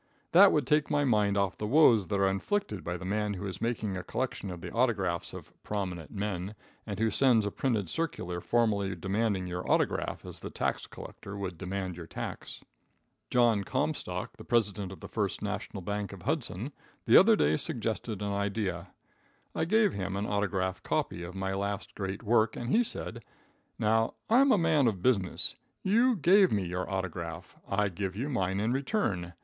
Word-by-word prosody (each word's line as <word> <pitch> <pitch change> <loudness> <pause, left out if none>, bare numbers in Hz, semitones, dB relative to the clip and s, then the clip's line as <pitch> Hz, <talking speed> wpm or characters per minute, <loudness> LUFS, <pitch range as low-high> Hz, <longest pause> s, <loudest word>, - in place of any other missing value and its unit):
That 190 +3 +8
would 150 -4 +2
take 150 +2 +2
my 145 - +2
mind 105 -5 +2
off 100 -2 0
the 105 - -2
woes 120 - +5
that 100 +3 0
are 100 - +4
inflicted 105 - -1
by 90 +1 -3
the 95 - -8
man 105 +1 -1
who 95 - -5
is 95 - -6
making 110 -4 -1
a 90 - -3
collection 125 -4 -3
of 90 -2 -7
the - - -6
autographs 100 -8 0
of - - -10
"prominent 90 -6 -4
men," 100 -1 -3 0.3
and 100 -2 -4
who 110 +1 +1
sends 120 -3 +4
a 100 - -1
printed 110 -7 0
circular 90 - -3
formally 100 -4 +1
demanding 95 +2 0
your 90 0 -3
autograph, - - 0
as - - -9
the - - -6
tax - - -2
collector 100 +1 -9
would 95 -3 -4
demand 95 0 -4
your 85 -2 -8
tax. - - -6 0.7
John 120 -4 +3
Comstock, - - -2
the - - -10
President 105 -5 0
of 95 - -10
the - - -7
First - - -2
National 95 - -4
Bank, 100 0 -3
of - - -11
Hudson, - - -2 0.3
the - - +5
other - - +7
day 75 +1 +3
suggested 105 +6 -3
an 100 - -1
idea. 100 0 -2 0.7
I - - 0
gave 210 +2 +3
him 95 -1 -3
an 100 +1 -1
autograph 95 -3 -1
copy 85 - -1
of 90 +2 -7
my 95 0 -2
last 100 +1 -3
great 95 0 -4
work, 110 0 +3
and 120 +1 -4
he 240 - +5
said: 115 - -4 0.5
"Now, 110 +1 +2 0.2
I'm 265 +4 +6
a 215 - +5
man 160 -6 +3
of 95 -6 -1
business. 100 -8 +1 0.3
You 235 +6 +4
gave 190 +2 +5
me 100 -3 +1
your 90 +1 -3
autograph, 90 -3 -4
I 100 +1 +1
give 95 +1 -4
you 130 +8 -2
mine 95 -7 0
in 110 +4 +1
return. 125 - -1
100 Hz, 185 wpm, -30 LUFS, 95-120 Hz, 0.7 s, That